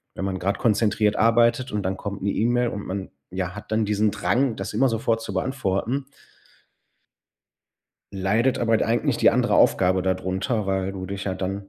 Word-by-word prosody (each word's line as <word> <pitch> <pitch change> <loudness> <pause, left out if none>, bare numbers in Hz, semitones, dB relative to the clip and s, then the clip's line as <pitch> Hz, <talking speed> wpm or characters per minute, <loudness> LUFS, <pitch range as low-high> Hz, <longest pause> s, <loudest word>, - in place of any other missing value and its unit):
wenn 95 - -3
man 95 -1 -3
grad 100 +3 -1
konzentriert 105 -1 +2
arbeitet 115 +3 +3
und 105 -1 -2
dann 95 +1 -1
kommt 100 -1 -6
'ne 100 - +1
E-Mail 120 +3 +1
und 100 -2 -6
man, 95 +1 -5 0.2
ja, 90 -1 -3
hat 105 +1 -10
dann 110 0 +1
diesen 105 +1 +1
Drang, 125 +2 0
das - - -5
immer 135 0 +3
sofort 115 0 0
zu 115 - -6
beantworten 125 +4 -1 2.1
leidet 105 +7 +1
aber 115 -1 +2
d - - 0
eigentlich 115 0 +1
die - - +5
andere - - +1
Aufgabe 95 0 +3
da 95 0 +1
drunter, 95 +4 -2
weil 95 0 -1
du 95 -1 -6
dich 100 +1 -5
ja 95 - -2
dann 95 +1 -4
105 Hz, 185 wpm, -24 LUFS, 95-115 Hz, 2.1 s, die